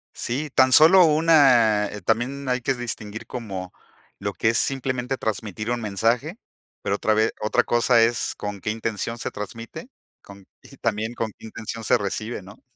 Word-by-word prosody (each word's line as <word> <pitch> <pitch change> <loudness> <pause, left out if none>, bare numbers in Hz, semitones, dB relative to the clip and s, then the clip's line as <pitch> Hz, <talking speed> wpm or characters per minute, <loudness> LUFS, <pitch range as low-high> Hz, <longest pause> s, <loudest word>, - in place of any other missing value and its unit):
Sí, 140 +6 -3
tan 130 -1 +4
solo 170 +5 +8
una 135 -10 +4
eh, 105 0 -8
también 125 +7 -1
hay 125 0 +1
que 135 +2 0
distinguir, 110 -3 -6
como 95 -7 -6 0.5
lo 100 0 -3
que 110 - +1
es 115 - +1
simplemente 130 -1 -1
transmitir 110 +1 -3
un 120 - -1
mensaje, 115 - -1 0.4
pero 100 - -1
otra 110 - +1
ve 110 +1 +2
otra 105 - +1
cosa 120 0 +3
es 115 0 0
con 105 -1 -6
qué 105 - -2
intención 115 +1 -3
se - - -5
transmite, 115 +2 -8 0.3
con 100 -1 -14 0.2
y - - -15
también 110 +1 -2
con 115 -2 -3
qué - - -13
intención 115 0 -7
se - - +4
recibe, 105 +2 -4
¿no? 100 +3 -15
115 Hz, 175 wpm, -23 LUFS, 105-125 Hz, 0.5 s, solo